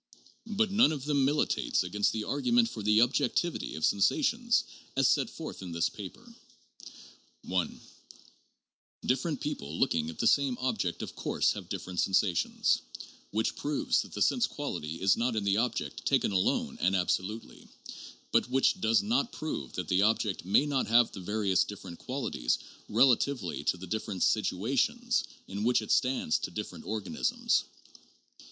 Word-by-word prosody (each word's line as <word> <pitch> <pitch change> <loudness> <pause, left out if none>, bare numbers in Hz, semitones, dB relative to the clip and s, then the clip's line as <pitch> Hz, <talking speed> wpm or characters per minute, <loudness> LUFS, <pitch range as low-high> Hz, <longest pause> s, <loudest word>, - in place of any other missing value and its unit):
But 215 -1 0
none 200 -5 +5
of 145 -3 -4
them 140 -2 +2
militates 145 -7 +1
against 100 +3 0
the 110 -1 -3
argu 145 - -2
ment 235 -1 +5
for 110 - -7
the 105 +2 +4
objectivity 135 - 0
of 80 - 0
sensations 235 - +2 0.3
as 135 -1 +4
set 135 -6 +2
forth 160 -9 -8
in 90 -3 -7
this 85 -1 +1
paper. - - -10 1.1
(1) 90 -2 -2 1.3
Different 135 +5 0
people 80 - -4
looking 80 -1 +1
at 80 - -8
the - - -1
same 135 -1 +3
object 110 -9 -2
of - - -7
course - - +1
have - - -7
dif - - -4
ferent 90 -1 -5
sensations, 95 -2 +2 0.5
which 110 +1 -1
proves 145 0 0
that - - -10
the - - +1
sense - - +2
quality 75 +2 -5
is 95 0 +3
not 120 0 0
in 110 - -1
the 100 0 +2
object 115 - -2
taken - - +2
alone 95 -1 0
and 95 +1 +3
absolutely, 95 +4 -2 0.6
but - - +2
which 130 +1 +2
does 110 +1 +3
not 235 +3 +1
prove 115 - -5
that - - -4
the 90 +1 +2
object 105 -2 +1
may 100 +9 +4
not 140 -3 0
have 115 +1 +4
the - - -8
various 100 0 +1
different 95 -4 -9
qualities 125 - -1 0.3
relatively 125 -3 +2
to - - +1
the 95 - -8
different 100 -1 -3
situations 230 - +1 0.2
in 100 +2 -4
which 120 +2 +3
it - - -4
stands 125 -11 +2
to - - -4
different - - -7
organisms. 105 -3 0
110 Hz, 160 wpm, -30 LUFS, 95-140 Hz, 1.3 s, none